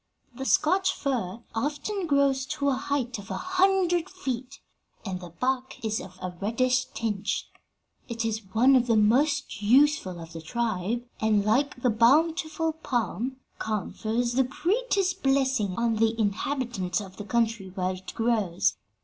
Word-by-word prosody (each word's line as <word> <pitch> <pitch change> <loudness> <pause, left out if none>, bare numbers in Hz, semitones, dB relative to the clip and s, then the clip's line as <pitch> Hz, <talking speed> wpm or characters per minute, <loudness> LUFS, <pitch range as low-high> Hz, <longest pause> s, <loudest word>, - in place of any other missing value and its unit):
The 265 +2 -6
Scotch 375 +7 +3
fir 235 -6 -3
often 300 - -2
grows 280 -2 +2
to 295 -1 -3
the 280 - +3
height 255 -4 -2
of 200 +2 -11
a - - -3
hundred 370 -2 +2
feet, 270 -7 -5 0.5
and 185 -2 -3
the 175 - -8
bark 255 +9 -2
is 220 0 0
of 185 -1 -11
a 180 -1 -4
reddish 255 +5 +1
tinge. 210 -3 -2 0.6
'It 230 -1 -2
is 220 -1 -1
one 255 +6 +5
of 250 -1 +3
the 230 -2 +3
most 275 +5 +2
useful 240 - +3
of 165 0 -10
the 165 - -7
tribe, 225 +4 -2 0.2
and, 215 -2 +2
like 250 +4 +1
the 250 - +4
bountiful 315 +7 +3
palm, 255 -4 -2 0.2
confers 220 +3 -2
the 265 +2 +4
greatest 380 - 0
blessing 265 -8 +1
on 230 -1 +1
the 225 +1 +1
inhabitants 215 -3 -1
of 195 -2 -9
the 205 - -5
country 225 -3 0
where 185 0 -2
it 185 0 -8
grows. 220 -7 +1
240 Hz, 150 wpm, -27 LUFS, 210-280 Hz, 0.6 s, one